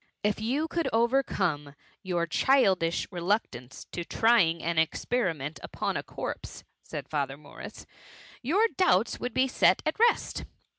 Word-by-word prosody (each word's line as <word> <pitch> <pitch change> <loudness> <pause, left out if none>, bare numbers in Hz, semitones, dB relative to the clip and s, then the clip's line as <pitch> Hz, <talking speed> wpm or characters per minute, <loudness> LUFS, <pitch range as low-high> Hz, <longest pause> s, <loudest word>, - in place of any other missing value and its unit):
^^If 210 +1 0
you 270 +8 0
could 330 -4 -1
overcome 200 - +1 0.3
your 175 -4 -1
childidb 185 - +2
re^ 175 -3 -6
luctance 130 - -2
to 175 - -4
trying 175 -6 +3
an 170 0 +1
experiment 160 - -1
upon - - -3
a - - -1
corpse/' - - -7 0.2
said - - -7
Father 140 -2 -2
M^urria, 145 -1 -11
^^ - - -12 0.6
your 350 - +3
doubts 235 - +3
would 245 -2 -4
be 260 +1 +3
set 265 - +3
at - - -1
rest. 470 +1 +2
190 Hz, 145 wpm, -28 LUFS, 160-250 Hz, 0.6 s, trying